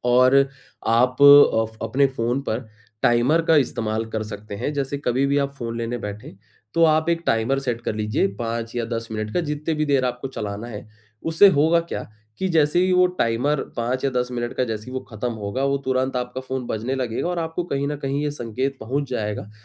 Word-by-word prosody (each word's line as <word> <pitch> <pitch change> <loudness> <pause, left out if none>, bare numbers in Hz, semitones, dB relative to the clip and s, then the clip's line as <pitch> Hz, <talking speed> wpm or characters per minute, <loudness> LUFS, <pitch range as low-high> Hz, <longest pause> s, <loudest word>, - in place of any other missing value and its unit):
और 130 +2 +5 0.5
आप 125 +4 +2
अ, 140 -6 +8
फ - - -25
अपने 130 +5 +2
फ़ोन 125 0 -1
पर 110 +1 -3 0.3
टाइमर 125 +8 +3
का 165 - +6
इस्तेमाल 110 -2 -2
कर 110 -1 -2
सकते 105 -1 -8
हैं, 145 - -2
जैसे 140 0 -2
कभी 125 +3 +1
भी 140 +1 +2
आप 140 0 -1
फ़ोन 115 -3 -5
लेने 115 +1 -2
बैठें 105 +1 -6 0.4
तो 165 - +5
आप 155 +1 +3
एक 170 0 0
टाइमर 115 +5 +2
सेट 120 -3 -2
कर 110 - -3
लीजिए 105 -2 0
5 115 0 -3
या 115 - 0
10 115 0 -4
मिनट 110 0 -3
का 180 - +2
जितनी 150 0 -2
भी 155 0 0
देर 135 -2 +2
आपको 125 +1 -3
चलाना 105 -2 -5
है, 105 -1 -8 0.3
उससे 165 +5 +6
होगा 160 +1 +4
क्या 170 - -5 0.4
कि 190 - 0
जैसे 160 0 +3
ही 185 - +2
वो 180 0 +5
टाइमर 125 +6 +1 0.2
5 125 +3 -1
या 135 - +2
10 125 -1 -1
मिनट 120 0 -3
का 130 - +2
जैसे 110 -1 -5
ही 130 - -8
वो 130 - -3
ख़त्म 115 +2 -3
होगा, 110 +5 -3
वो 140 0 +2
तुरंत 130 0 0
आपका 125 +1 -3
फ़ोन 130 -1 -4
बजने 115 +5 -2
लगेगा 125 +5 -2
और 180 -1 -2
आपको 165 +1 -2
कहीं 140 -4 -2
न 150 - -2
कहीं 140 +1 -2
ये 150 - 0
संकेत 130 +1 -3
पहुँच 135 +5 -2
जाएगा, 105 -3 -3
130 Hz, 215 wpm, -23 LUFS, 115-145 Hz, 0.5 s, अ